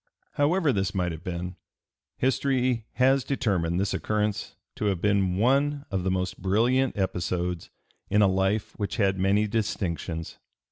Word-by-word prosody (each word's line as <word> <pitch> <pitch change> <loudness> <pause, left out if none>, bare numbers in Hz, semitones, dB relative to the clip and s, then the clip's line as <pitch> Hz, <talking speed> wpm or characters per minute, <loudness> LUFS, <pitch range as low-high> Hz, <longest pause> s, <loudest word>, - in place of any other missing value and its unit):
However 150 0 +2
this 100 +1 -1
might 90 -2 0
have 80 +1 -8
been, 90 0 -5 0.6
history 130 -3 +1
has 130 +1 +3
determined 95 -11 0
this 100 0 0
occurrence 105 -1 -1 0.2
to - - -2
have 100 -4 +1
been 100 -2 +1
one 140 +5 +2
of 95 -2 -1
the 95 - 0
most 95 0 -2
brilliant 120 +8 +2
episodes 90 -2 -2 0.4
in 105 0 +4
a - - +6
life 95 +2 0
which 100 - -2
had 95 -3 +2
many 100 +3 +3
distinctions. 90 -6 -3
100 Hz, 145 wpm, -26 LUFS, 90-125 Hz, 0.6 s, a